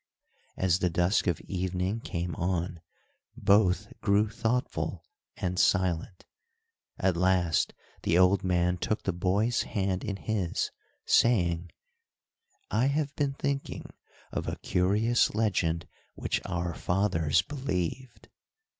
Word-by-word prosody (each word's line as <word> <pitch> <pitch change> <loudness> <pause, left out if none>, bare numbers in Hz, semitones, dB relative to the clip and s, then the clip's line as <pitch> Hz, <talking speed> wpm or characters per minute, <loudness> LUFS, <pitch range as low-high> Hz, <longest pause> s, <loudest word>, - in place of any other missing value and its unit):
As 95 -1 +2
the 90 - +2
dusk 90 +5 +2
of 85 -4 +1
evening 95 +3 -2
came 85 -5 -4
on, 85 -1 -2 0.6
both 100 -3 +3
grew 105 +2 +3
thoughtful 115 +3 -2 0.3
and 90 0 -2
silent; 90 -1 +1 0.7
at 95 -2 +1
last 90 -2 +2 0.3
the 85 - +2
old 95 +1 +4
man 90 -1 +1
took 110 - -1
the 95 - 0
boy's 100 +7 +1
hand 95 -3 -1
in 100 - -2
his, 100 -4 -2 0.3
saying: 85 -7 +3 1.0
"I 125 - +3
have 145 0 -1
been 145 -2 0
thinking 140 0 -3 0.4
of - - -3
a - - -2
curious 105 +6 +2
legend 90 -7 +1 0.3
which - - -1
our 85 -1 -2
fathers 90 0 +1
believed." 130 - -4
95 Hz, 115 wpm, -29 LUFS, 90-110 Hz, 1.0 s, old